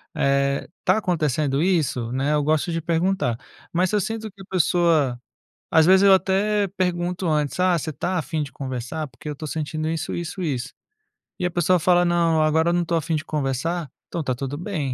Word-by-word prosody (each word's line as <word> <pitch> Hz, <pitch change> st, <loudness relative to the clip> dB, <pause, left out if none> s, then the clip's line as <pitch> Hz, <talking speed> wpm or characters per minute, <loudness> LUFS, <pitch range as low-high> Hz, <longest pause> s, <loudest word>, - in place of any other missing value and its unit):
Eh, 140 Hz, 0 st, +1 dB
está -, -, +2 dB
acontecendo 155 Hz, -, 0 dB
isso?". 150 Hz, -10 st, 0 dB
Né, 135 Hz, +3 st, 0 dB
eu 150 Hz, -1 st, +2 dB
gosto 155 Hz, +3 st, +1 dB
de 165 Hz, 0 st, -2 dB
perguntar. 170 Hz, -6 st, 0 dB, 0.4 s
Mas 180 Hz, +1 st, +2 dB
se -, -, 0 dB
eu 205 Hz, -, +2 dB
sinto 220 Hz, +1 st, -4 dB
que 195 Hz, -, -15 dB
a -, -, -11 dB
pessoa 165 Hz, -7 st, +2 dB, 0.5 s
às 160 Hz, -1 st, +5 dB
vezes 190 Hz, +1 st, +6 dB
eu 200 Hz, -1 st, +7 dB
até 200 Hz, +2 st, +1 dB
pergunto 180 Hz, 0 st, -1 dB
antes: 150 Hz, +1 st, 0 dB
"Ah, 180 Hz, -2 st, +3 dB
você 155 Hz, +1 st, -4 dB
está 180 Hz, +4 st, -2 dB
afim 160 Hz, +1 st, -2 dB
de 145 Hz, -, -6 dB
conversar? 130 Hz, +3 st, -4 dB
Porque 130 Hz, +4 st, -11 dB
eu -, -, -2 dB
estou 150 Hz, +2 st, -7 dB
sentindo 155 Hz, +1 st, -3 dB
isso, 165 Hz, +1 st, -3 dB
isso, 170 Hz, +2 st, -4 dB
isso". 135 Hz, -5 st, -2 dB, 0.7 s
E 180 Hz, -, -1 dB
a 180 Hz, -, 0 dB
pessoa 175 Hz, +1 st, +2 dB
fala: 175 Hz, +1 st, +4 dB
"Não, 170 Hz, -2 st, +2 dB
agora 160 Hz, +2 st, +3 dB
eu -, -, +1 dB
não 175 Hz, -, +2 dB
estou 170 Hz, 0 st, 0 dB
afim 160 Hz, 0 st, -1 dB
de 155 Hz, -, -3 dB
conversar". 150 Hz, +2 st, -2 dB, 0.2 s
Então 170 Hz, -, -3 dB
está 130 Hz, -3 st, -1 dB
tudo 135 Hz, +3 st, -4 dB
bem, 160 Hz, -6 st, -3 dB
160 Hz, 205 wpm, -23 LUFS, 145-180 Hz, 0.7 s, eu